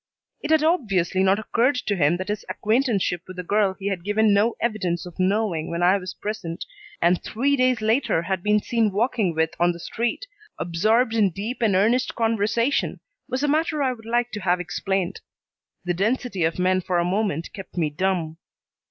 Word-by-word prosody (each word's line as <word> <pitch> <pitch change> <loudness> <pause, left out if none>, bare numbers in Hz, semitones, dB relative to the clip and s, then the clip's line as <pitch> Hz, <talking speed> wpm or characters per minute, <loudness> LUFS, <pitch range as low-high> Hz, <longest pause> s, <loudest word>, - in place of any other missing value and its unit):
It 295 - -4
had 315 -1 +4
obviously 195 - +1
not 190 +1 +4
occurred 240 +5 +1
to 215 -5 -1
him 165 0 +2
that 185 +2 -5
his 210 0 -2
acquaintanceship 215 - 0
with 185 0 -10
a 180 - -4
girl 200 +1 +1
he 195 - -10
had 185 -4 -3
given 210 +1 +3
no 215 +3 +2
evidence 190 -7 -1
of 180 +1 -11
knowing 185 -4 0
when 170 +1 -2
I 185 +3 +5
was 185 -1 -7
present, 205 -6 -5 0.4
and 175 +1 +3
three 275 +6 +1
days 255 -3 +2
later 220 -6 +1
had 190 0 -2
been 210 +2 +3
seen 230 -3 +1
walking 210 -4 0
with 160 0 +1
on 175 0 +3
the 170 - -10
street, 235 - -3 0.3
absorbed 215 +8 +1
in 215 -4 +3
deep 210 +9 -5
and 215 -4 +3
earnest 230 +6 +2
conversation, 230 +3 0 0.3
was 260 +2 -2
a - - +2
matter 310 0 +1
I 260 -1 +1
would 225 -2 -13
like 240 +1 0
to 210 - -4
have 180 -1 +1
explained. 185 +1 -2 0.6
The 175 - 0
density 205 -1 0
of 160 - -1
men 185 +1 +2
for 180 0 -1
a 170 - +2
moment 185 -3 -1
kept 195 -2 -10
me 155 -3 +1
dumb. 165 -1 -1
200 Hz, 195 wpm, -23 LUFS, 180-230 Hz, 0.6 s, I